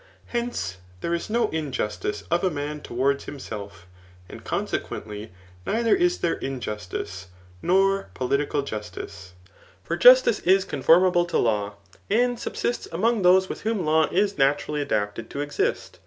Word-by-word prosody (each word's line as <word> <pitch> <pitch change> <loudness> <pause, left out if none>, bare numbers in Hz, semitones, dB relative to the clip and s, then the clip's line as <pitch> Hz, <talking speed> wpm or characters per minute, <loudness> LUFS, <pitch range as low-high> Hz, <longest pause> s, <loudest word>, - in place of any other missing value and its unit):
Hence, 235 - -3 0.2
there 170 - -1
is 170 - -3
no 235 +2 +2
injustice 130 -9 -3
of 170 +2 +2
a 185 - +3
man 150 -1 -4
towards 135 +3 0
himself; 105 -9 -8 0.4
and - - -11
consequently 105 0 -4 0.3
neither 230 - +2
is 355 -1 +2
there 170 - 0
injustice, 105 -7 -5 0.3
nor 195 - +2
political 140 +5 0
jusdce. 100 -5 -7 0.5
For - - -2
justice - - +7
is 190 +2 +3
conformable 175 +4 +4
to 175 - -1
law, 105 -3 0 0.3
and 245 +2 +2
subsists 240 - -3
among 220 +6 +1
those 185 +1 +5
with - - -6
whom 215 -5 -1
law 155 +1 +3
is 200 -1 +1
naturally 145 +2 +1
adapted 105 -4 -2
to 140 - -4
exist. 145 0 -2
150 Hz, 140 wpm, -25 LUFS, -, 0.5 s, justice